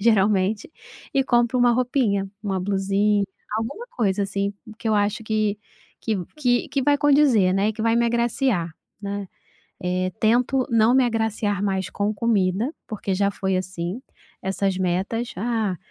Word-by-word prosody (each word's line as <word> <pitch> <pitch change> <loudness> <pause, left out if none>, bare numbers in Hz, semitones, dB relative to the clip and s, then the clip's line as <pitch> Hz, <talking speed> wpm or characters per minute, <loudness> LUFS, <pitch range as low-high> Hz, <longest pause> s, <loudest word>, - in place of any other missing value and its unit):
geralmente 205 0 +2 0.4
e 270 -1 +3
compro 240 0 +2
uma 245 -1 +5
roupinha, 235 -6 +1
uma 190 -3 -1
blusinha, 200 +1 +1 0.3
alguma 415 - -5
coisa 205 - 0
assim 200 +1 -2 0.3
que 230 - -3
eu 215 - +3
acho 205 +2 0
que 215 -1 0 0.4
que 220 -3 -1 0.2
que 245 -4 +1
que 275 - -1
vai 285 +1 +3
condizer, 275 -10 +4
né, 195 +2 +2
e 220 - 0
que 220 - -4
vai 230 +1 +3
me 235 - +3
agraciar, 235 -6 0 0.3
né. 200 -1 -4 0.6
Eh, 185 +1 0
tento 245 +4 +3
não 230 +1 +4
me 260 - +5
agraciar 220 -3 0
mais 190 -2 -1
com 210 +1 -1
comida, 210 - +1
porque 200 -3 -3
já 200 +1 +2
foi 190 -1 -1
assim, 185 +3 -4 0.4
essas 190 0 -1
metas: 190 +6 -1
"Ah, 220 -3 -1
210 Hz, 155 wpm, -23 LUFS, 195-235 Hz, 0.6 s, uma